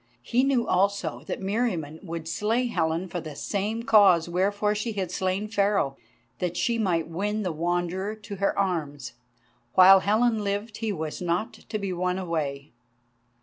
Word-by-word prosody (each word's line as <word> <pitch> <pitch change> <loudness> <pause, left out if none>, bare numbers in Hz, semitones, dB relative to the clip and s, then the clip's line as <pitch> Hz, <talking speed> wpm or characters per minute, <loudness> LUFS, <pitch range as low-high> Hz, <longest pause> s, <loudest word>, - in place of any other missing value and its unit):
He 245 - +2
knew 270 -3 +2
also 185 -8 +1
that - - -4
Meriamun 190 -8 -1
would 165 -3 -6
slay 225 +8 0
Helen 170 -5 -1
for 175 0 -4
the 155 -3 -8
same 210 +7 -2
cause 195 -7 +5
wherefore 205 +4 +1
she 210 +2 -3
had 190 -4 -3
slain 190 +3 -1
Pharaoh, 200 -9 +1 0.4
that 180 -1 -2
she 235 -1 +1
might 175 -6 +1
win 205 +6 -2
the 180 - -1
Wanderer 175 +5 -1
to 205 -1 -9
her 200 +1 0
arms. 150 -8 -2 0.6
While 190 +1 +9
Helen 220 +2 +2
lived 205 +2 -3
he 225 -2 -2
was 160 -4 -4
not 175 +5 -1
to 215 - -6
be 195 -3 -3
won 180 +1 -1
away. 155 -6 -3
190 Hz, 160 wpm, -26 LUFS, 170-210 Hz, 0.6 s, While